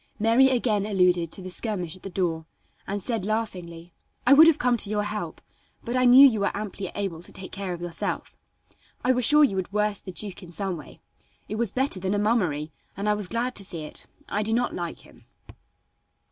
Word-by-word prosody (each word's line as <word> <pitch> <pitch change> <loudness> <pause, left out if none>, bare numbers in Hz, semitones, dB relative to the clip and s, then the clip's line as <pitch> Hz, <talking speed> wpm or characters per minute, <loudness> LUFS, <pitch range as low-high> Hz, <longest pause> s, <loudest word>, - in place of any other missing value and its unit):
Mary 230 +5 +4
again 230 -5 +1
alluded 180 -4 +2
to 190 - -5
the 185 - -6
skirmish 180 -5 -2
at 185 - -14
the 195 - -7
door, 170 -4 -2 0.4
and 200 -1 -3
said 230 -5 -2
laughingly: 180 -6 -4 0.3
"I 255 - +7
would 315 +3 +9
have 330 - +5
come 250 -1 +2
to 205 - -2
your 210 0 0
help, 210 +1 -5 0.4
but 240 +1 -3
I 255 0 +3
knew 255 +3 +9
you 225 -5 0
were 200 0 -1
amply 200 -2 -5
able 190 -5 -3
to - - -15
take 190 - -8
care 195 -1 -4
of 175 -1 -5
yourself. 175 -1 -4 0.7
I 255 - +3
was 250 -2 +3
sure 300 +3 +6
you 200 -9 +2
would 190 +1 -3
worst 210 0 0
the 190 - -6
duke 195 +1 -3
in 175 -2 -11
some 190 0 -2
way. 150 -4 -12 0.5
It - - -5
was 230 -3 -1
better 260 -5 0
than 190 +2 -1
a - - +1
mummery, 180 -9 0 0.3
and 200 +1 -3
I 210 - +4
was 210 -2 -3
glad 240 +5 -2
to 200 - -3
see 170 -4 -5
it. 150 - -8 0.2
I 210 - -1
do 220 +1 0
not 245 +1 0
like 175 -2 -5
him." - - -18
205 Hz, 220 wpm, -25 LUFS, 180-230 Hz, 0.7 s, would